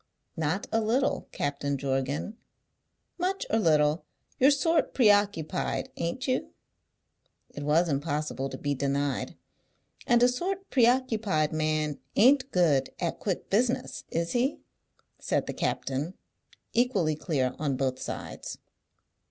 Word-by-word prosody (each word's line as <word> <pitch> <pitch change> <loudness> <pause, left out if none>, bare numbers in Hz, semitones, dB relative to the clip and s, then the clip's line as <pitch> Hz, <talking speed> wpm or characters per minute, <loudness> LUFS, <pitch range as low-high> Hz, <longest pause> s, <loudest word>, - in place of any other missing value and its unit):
"Not 160 +5 -1
a 225 - +2
little, 240 +6 0
Captain 140 0 -2
Jorgan." 135 +8 -2 0.8
"Much 375 +2 -1
or 225 - +3
little, 155 -3 +3 0.4
you're 265 - +7
sort 325 +3 +2
preoccupied; 205 - +2
ain't 170 +12 -3
you?" 255 0 0 1.0
It 145 - -7
was 155 +4 +3
impossible 145 -2 -2
to - - -6
be 145 0 -1
denied. 140 0 -1 0.7
"And 240 0 +5
a - - +8
sort 375 +10 -2
preoccupied 225 - +2
man 155 -1 0 0.2
ain't 265 +4 +5
good 150 -7 +3
at 170 - -2
quick 190 -4 -3
business, 250 +5 0
is 165 0 -1
he?" 255 +4 0 0.6
said - - 0
the - - -4
captain. 145 +7 -2 0.6
Equally 205 -11 +2
clear 135 -6 -1
on 140 -4 -1
all 130 -2 +1
sides. - - -6
170 Hz, 120 wpm, -28 LUFS, 145-240 Hz, 1.0 s, a